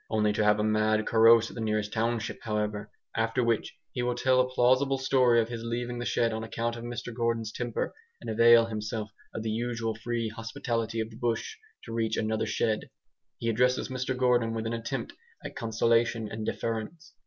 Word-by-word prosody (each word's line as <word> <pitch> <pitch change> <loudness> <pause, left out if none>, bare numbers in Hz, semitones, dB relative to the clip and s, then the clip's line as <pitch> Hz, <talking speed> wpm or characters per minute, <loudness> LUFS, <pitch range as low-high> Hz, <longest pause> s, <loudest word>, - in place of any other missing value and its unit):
Only 105 -1 +2
to 105 - +1
have 105 0 +4
a - - +1
mad 110 0 +2
carouse 115 0 +5
at - - -12
the 115 - -6
nearest 105 -1 -1
township, 115 0 -1
however; 105 -2 -2 0.3
after 115 +2 +1
which 115 -2 0 0.2
he 125 - -3
will 120 0 0
tell 130 +1 +3
a 130 - -1
plausible 130 +2 +3
story 130 -3 +4
of 115 0 0
his 115 -1 -5
leaving 120 +1 -3
the 120 - -3
shed 115 -1 +1
on 110 0 -3
account 115 +1 -2
of 115 - -8
Mr 120 0 -5
Gordon's 115 -2 -1
temper, 120 -1 -3 0.3
and - - -10
avail 115 +1 +6
himself 110 -1 -4 0.2
of 110 - -5
the 110 - -1
usual 115 0 -2
free 115 +1 -2
hospitality 115 0 -3
of 110 +1 -5
the 110 - -12
bush 120 - -2 0.3
to - - -8
reach 115 -1 0
another 110 0 0
shed. 110 +1 -1 0.5
He 115 - -4
addresses 125 +4 +2
Mr 130 0 -2
Gordon 120 -3 +2
with 110 0 -3
an 115 - -2
attempt 115 +2 -4 0.3
at - - -6
conciliation 115 0 +1
and 110 0 -5
deference. 115 +9 -4
115 Hz, 195 wpm, -28 LUFS, 110-120 Hz, 0.5 s, avail